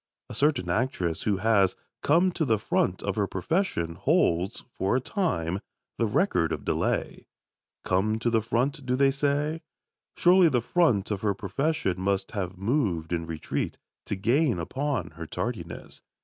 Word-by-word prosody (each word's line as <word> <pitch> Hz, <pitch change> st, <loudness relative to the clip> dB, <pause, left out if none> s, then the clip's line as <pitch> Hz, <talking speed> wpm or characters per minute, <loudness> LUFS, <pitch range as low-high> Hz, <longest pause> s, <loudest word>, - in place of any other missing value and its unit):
A -, -, -6 dB
certain 145 Hz, -3 st, +1 dB
actress 100 Hz, -9 st, 0 dB
who 105 Hz, -3 st, +1 dB
has 100 Hz, -2 st, +3 dB, 0.3 s
"come 175 Hz, +5 st, +4 dB
to 170 Hz, -, -1 dB
the 115 Hz, -7 st, +2 dB
front 95 Hz, -2 st, 0 dB
of 100 Hz, 0 st, -2 dB
her 100 Hz, -2 st, +1 dB
profession" 95 Hz, -, -1 dB
holds, 95 Hz, -, +1 dB
for 95 Hz, +5 st, +1 dB
a -, -, +3 dB
time, 95 Hz, -, -1 dB, 0.4 s
the 115 Hz, -, +2 dB
record 105 Hz, -, +1 dB
of -, -, -4 dB
delay. -, -, -1 dB, 0.6 s
"Come 105 Hz, +4 st, +1 dB
to 120 Hz, +1 st, 0 dB
the 115 Hz, -1 st, +3 dB
front," 130 Hz, +7 st, -1 dB
do 125 Hz, 0 st, 0 dB
they 135 Hz, +1 st, +4 dB
say? 145 Hz, +3 st, 0 dB, 0.6 s
Surely 180 Hz, -1 st, +6 dB
the 125 Hz, -, +2 dB
front 115 Hz, -, +2 dB
of 100 Hz, -2 st, -2 dB
her 100 Hz, -2 st, +1 dB
profession 100 Hz, -, -1 dB
must 100 Hz, 0 st, 0 dB
have 95 Hz, -4 st, -4 dB
moved 95 Hz, -, 0 dB
in 85 Hz, -1 st, -2 dB
retreat, 80 Hz, -2 st, -3 dB, 0.3 s
to -, -, -1 dB
gain 120 Hz, -, +2 dB
upon 130 Hz, -, -2 dB
her 85 Hz, +1 st, -8 dB
tardiness. 100 Hz, -8 st, -5 dB
110 Hz, 160 wpm, -27 LUFS, 95-145 Hz, 0.6 s, Surely